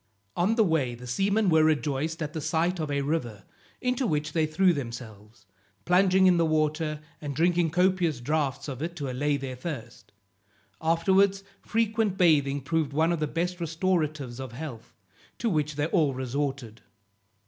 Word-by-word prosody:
On 190 +6 +2
the 225 - +4
way 150 - 0
the 125 +1 -11
seamen 200 - +1
were 160 -3 +5
rejoiced 155 +1 0
at 150 +1 -5
the 160 - -4
sight 165 +4 0
of 155 -2 -2
a 140 -1 0
river, 120 -9 -2 0.4
into 250 0 0
which 150 -3 -1
they 160 -2 +2
threw 180 +4 +3
themselves, 115 -5 -8 0.4
plunging 190 +1 +4
in 180 -2 +5
the 170 - +3
water, 155 0 0 0.2
and 145 -2 -5
drinking 170 +1 +2
copious 180 -4 +1
draughts 145 +1 -1
of 135 -2 -6
it 170 +2 -4
to 140 -6 -4
allay 145 +3 0
their 135 -2 -5
thirst. 120 - -7 0.7
Afterwards 190 +4 +3 0.2
frequent 220 -3 0
bathing 145 -6 +3
proved 155 0 -1
one 160 +3 +2
of 170 - -1
the 155 - 0
best 175 +3 -2
restoratives 155 -6 -1
of 130 -3 -7
health, 125 -4 -8 0.4
to 230 - -1
which 150 -2 0
they 145 0 0
all 155 -5 +1
resorted. 130 -3 -3
155 Hz, 165 wpm, -27 LUFS, 140-175 Hz, 0.7 s, were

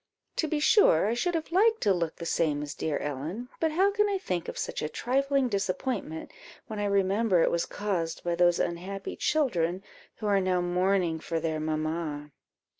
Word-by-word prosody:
To 320 - +1
be 305 0 -1
sure, 295 - +5
I 220 - +1
should 345 +9 0
have 320 0 -3
liked 445 +5 +3
to 200 - +3
look 170 -3 -2
the 170 - -7
same 150 -3 0
as 145 - -5
dear 155 -2 -2
Ellen; 155 - -4
but 320 -1 +1
how 385 +5 +3
can 420 0 +2
I 400 - +1
think 180 - -3
of - - -6
such - - -3
a 150 - -2
trifling 275 - +1
disappointment, 195 -4 -3 0.3
when 220 -5 -6
I 205 - 0
remember 200 -1 +2
it - - +2
was 170 - 0
caused 180 -6 -3
by 175 - 0
those 175 0 +4
unhappy 190 +3 -3
children, 185 - 0 0.3
who 215 - -7
are 200 -2 +3
now 185 -1 +1
mourning 180 -1 +1
for 165 +1 -2
their 160 -1 -2
mamma?" 155 -1 -3
185 Hz, 190 wpm, -28 LUFS, 165-250 Hz, 0.3 s, sure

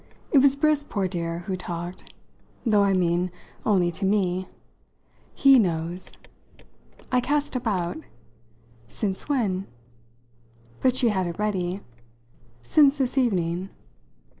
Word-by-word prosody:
It 280 - +6
was 275 0 +5
Briss, 300 0 +2
poor 200 -8 -2
dear, 170 -1 -4
who 190 - -2
talked 175 0 -7 0.5
though, 210 -3 +4
I 200 -1 +3
mean, 180 -1 +1 0.3
only 185 -5 +2
to 185 - -6
me. 190 -2 +1 0.9
He 275 -2 +6
knows." 175 -2 -2 0.9
I 250 -1 +3
cast 290 +1 -1
about. 200 - -1 0.9
"Since 195 - -4
when?" 200 -9 0 1.1
But 255 -1 +3
she 250 -2 +4
had 190 -4 0
it 170 - -5
ready. 195 -3 -1 0.8
"Since 285 - +4
this 265 -2 -1
evening." 185 -7 0
195 Hz, 115 wpm, -25 LUFS, 175-250 Hz, 1.1 s, It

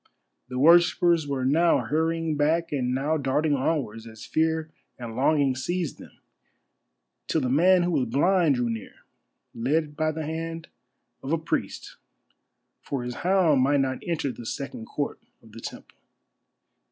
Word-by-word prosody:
The 125 0 -6
worshippers 170 +1 +4
were 135 -2 -2
now 165 +6 +4
hurrying 160 +1 -1
back 160 +3 +1
and 130 -4 -1
now 145 +4 0
darting 145 +2 0
onwards, 130 -6 -2
as 110 -1 -11
fear 160 0 0 0.3
and 115 -2 -7
longing 140 0 +2
seized 170 +4 -3
them, - - -13 1.1
till 160 - +1
the 125 -1 -1
man 180 +5 +5
who 175 - 0
was 135 -7 +1
blind 160 +4 +3
drew 125 -1 0
near, 115 -2 -5 0.6
led 150 +5 -1
by 155 +1 0
the 155 0 -5
hand 165 +1 -5 0.5
of 135 - -5
a 165 - +3
priest, 160 - -4 0.8
for 135 -3 -4
his 125 0 -5
hound 175 -7 +3
might 140 +2 +3
not 130 -1 -1
enter 160 -6 -2
the 120 - -10
second 135 -4 -5
court 145 -1 -3 0.2
of 110 - -17
the 115 +2 -11
temple. - - -10
150 Hz, 155 wpm, -26 LUFS, 130-165 Hz, 1.1 s, man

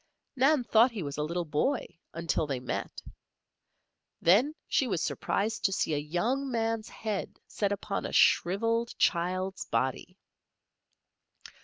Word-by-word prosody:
Nan 270 +1 +3
thought 230 +1 +5
he 220 -7 -5
was 145 -1 -5
a - - +1
little 170 +3 -2
boy, 235 - 0 0.3
until 165 -1 -1
they 135 -3 -2
met. 125 - -5 1.2
Then 235 - +4
she 270 - +2
was 190 -7 -1
surprised 220 +2 -1
to 195 - +3
see 165 - 0
a - - +1
young 225 - -1
man's 225 -2 -1
head 215 -3 -4
set 205 -1 -2
upon 200 0 -3
a - - -7
shriveled 230 +6 +2
child's 185 +2 0
body! 130 +8 -2
200 Hz, 135 wpm, -29 LUFS, 170-230 Hz, 1.2 s, thought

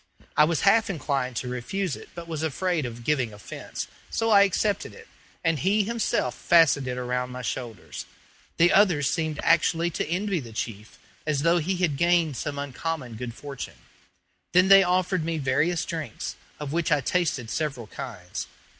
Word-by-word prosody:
I 150 - +6
was 160 -1 0
half 220 +2 +4
inclined 135 -7 -1
to 125 - -3
refuse 145 +10 -2
it, - - -12
but 170 -1 -7
was 160 -2 -4
afraid 160 -1 0
of 120 0 -9
giving 130 -4 +1
offence, 100 -3 -7 0.2
so 225 0 0
I 200 -1 +8
accepted 200 +1 +1
it, 460 -1 -14 0.4
and 165 -3 +2
he 200 +6 +3
himself 235 +2 0
fastened 160 -6 +4
it 125 0 -3
around 125 0 -2
my 125 0 -7
shoulders. 115 -4 -5 0.5
The 175 +1 +5
others 175 -9 +4
seemed 160 -3 -1
actually 165 0 +3
to - - -2
envy 190 +1 0
the 115 -5 -9
chief, 110 -1 -5 0.3
as 145 -2 +1
though 170 +1 +4
he 180 +4 -1
had 170 -6 +1
gained 170 -3 +3
some 145 +4 -4
uncommon 140 -1 -4
good 120 +1 -6
fortune. 140 -2 -7 0.8
Then 185 +2 +5
they 195 0 +10
offered 180 -1 +1
me 165 0 -1
various 155 +5 +1
drinks, 155 -9 -5 0.2
of 145 -1 -4
which 170 -1 0
I 150 - +4
tasted 135 -7 0
several 145 -6 -2
kinds. 105 -7 -7
155 Hz, 170 wpm, -26 LUFS, 125-175 Hz, 0.8 s, they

